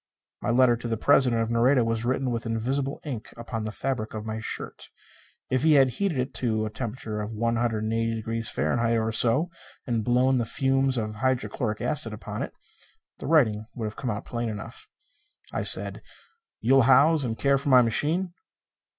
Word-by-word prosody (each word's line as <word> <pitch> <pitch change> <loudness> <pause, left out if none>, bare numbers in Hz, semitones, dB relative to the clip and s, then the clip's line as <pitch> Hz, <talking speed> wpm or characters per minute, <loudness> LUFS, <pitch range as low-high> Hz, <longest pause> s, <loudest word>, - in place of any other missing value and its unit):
My - - -2
letter 120 0 +4
to 120 - -6
the 115 -1 -1
President 125 -2 +3
of 115 - -4
Nareda 120 +1 +3
was 115 0 -1
written 130 +1 0
with 115 -1 -3
invisible 130 +5 -2
ink 125 -8 -6
upon 115 -2 -5
the 110 - -3
fabric 110 -2 -3
of 110 0 -5
my 110 0 -4
shirt. 110 - -6 0.6
If 130 -1 +2
he 155 +1 +4
had 135 -3 +5
heated 185 +3 -2
it 130 +1 -2
to 110 -3 0
a 110 - -5
temperature 110 -3 -5
of 105 +2 -5
180°F. 115 0 0
or 110 0 -1
so, 125 +10 +2 0.3
and 115 -4 -1
blown 125 +2 +2
the 120 - 0
fumes 135 +1 +1
of 110 -2 -3
hydrochloric 125 -2 -1
acid 115 -7 0
upon 105 - -6
it, - - -4 0.7
the - - -6
writing 115 -9 +3
would 115 - -4
have 105 - -5
come 130 - -4
out 105 0 -4
plain 120 -1 -3
enough. 425 - -8 0.7
I - - -1
said, - - +3 0.6
"You'll 135 +4 +5
house 145 +3 +5
and 115 -3 -3
care 140 -1 +2
for 140 - -3
my 130 -2 +7
machine?" 160 +10 0
120 Hz, 175 wpm, -26 LUFS, 110-135 Hz, 0.7 s, my